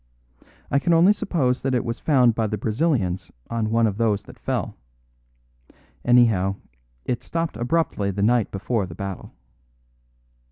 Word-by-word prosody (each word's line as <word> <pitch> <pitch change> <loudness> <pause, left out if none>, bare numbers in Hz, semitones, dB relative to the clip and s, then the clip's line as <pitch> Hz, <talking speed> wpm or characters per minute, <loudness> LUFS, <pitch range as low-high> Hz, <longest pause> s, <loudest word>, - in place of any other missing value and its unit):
I 140 - +3
can 170 +4 +1
only 175 +5 +6
suppose 140 -11 0
that 135 -1 0
it 120 - 0
was 115 0 -3
found 125 -6 +4
by 110 -1 0
the 105 - -3
Brazilians 105 - -1 0.2
on 115 -2 -1
one 115 +1 +3
of 105 -2 -1
those 105 -3 +1
that - - -15
fell. - - -3 1.3
Anyhow, 115 -6 +4 0.5
it 125 - -2
stopped 165 -5 -3
abruptly 120 -4 0
the 100 +1 -2
night 120 0 +2
before 100 +1 -2
the 80 - -10
battle. 100 0 -6
115 Hz, 150 wpm, -23 LUFS, 100-130 Hz, 1.3 s, only